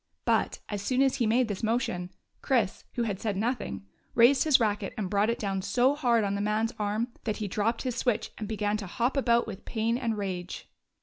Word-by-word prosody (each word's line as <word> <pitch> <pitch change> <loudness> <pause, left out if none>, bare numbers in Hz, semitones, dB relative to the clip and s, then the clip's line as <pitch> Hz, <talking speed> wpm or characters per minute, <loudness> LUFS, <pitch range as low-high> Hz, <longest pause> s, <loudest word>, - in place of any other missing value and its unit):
But, - - +1
as 205 -2 -4
soon 255 +6 +2
as 270 0 +2
he 235 -4 +1
made 240 +2 +3
this 205 -3 -4
motion, 215 -6 -1 0.3
Chris, 230 -8 0
who 240 - 0
had 205 -4 -2
said 210 -3 -2
nothing, 210 - -2 0.3
raised 245 +6 +6
his 300 -4 +6
racket 210 -3 -1
and 195 -4 -3
brought 205 +2 +2
it 235 - 0
down 195 -2 -2
so 255 +7 +3
hard 240 -6 +2
on 200 -1 0
the 200 - -1
man's 215 +2 0
arm 210 +3 -1 0.2
that 215 -2 -1
he 210 - -3
dropped 215 +4 -1
his 250 -2 -2
switch 230 -2 0
and 215 - -4
began 210 -1 -1
to 205 -2 -6
hop 240 +8 0
about 235 -4 +3
with 210 -2 -8
pain 230 +1 -1
and 230 -4 -1
rage. 185 -3 -4
220 Hz, 220 wpm, -28 LUFS, 205-240 Hz, 0.3 s, raised